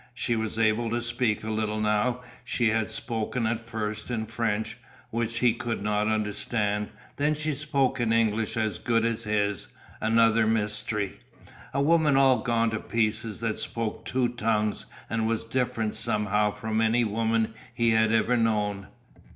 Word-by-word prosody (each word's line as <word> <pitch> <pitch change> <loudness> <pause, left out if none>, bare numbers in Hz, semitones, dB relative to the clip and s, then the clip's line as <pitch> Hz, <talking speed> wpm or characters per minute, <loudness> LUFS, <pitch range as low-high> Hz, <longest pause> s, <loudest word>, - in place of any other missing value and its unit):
She 120 +1 -1
was 110 -1 -2
able 115 +1 +2
to 120 +1 0
speak 120 -2 -1
a 110 - -3
little 110 0 -1
now. 105 +4 +1 0.2
She 120 -3 +1
had 110 0 0
spoken 115 +1 -2
at 110 0 0
first 110 -2 -4
in 115 -3 -2
French, 110 -1 -2 0.4
which 115 0 -1
he 120 -1 +4
could 115 -2 -3
not 105 0 +1
understand, 105 -1 -1 0.3
then 150 +2 +2
she 155 0 -2
spoke 140 -2 0
in 120 -2 +1
English 115 -1 +1
as 110 -6 -1
good 115 -1 +1
as 115 0 -1
his; 105 -1 0 0.3
another 115 0 +4
mystery. 105 -2 0 0.5
A 140 - +1
woman 155 -2 +4
all 135 -3 +5
gone 115 -2 +1
to 110 - -2
pieces 110 -1 -1
that 110 -2 -1
spoke 115 -1 -3
two 125 +1 0
tongues 110 -2 -1 0.2
and 110 0 0
was 115 0 -1
different 115 -3 -1
somehow 105 0 +1
from 110 +2 -2
any 115 +2 +3
woman 115 +1 0 0.2
he 115 -1 +2
had 110 0 +3
ever 115 +2 +3
known. 105 -4 0
110 Hz, 160 wpm, -27 LUFS, 110-120 Hz, 0.5 s, all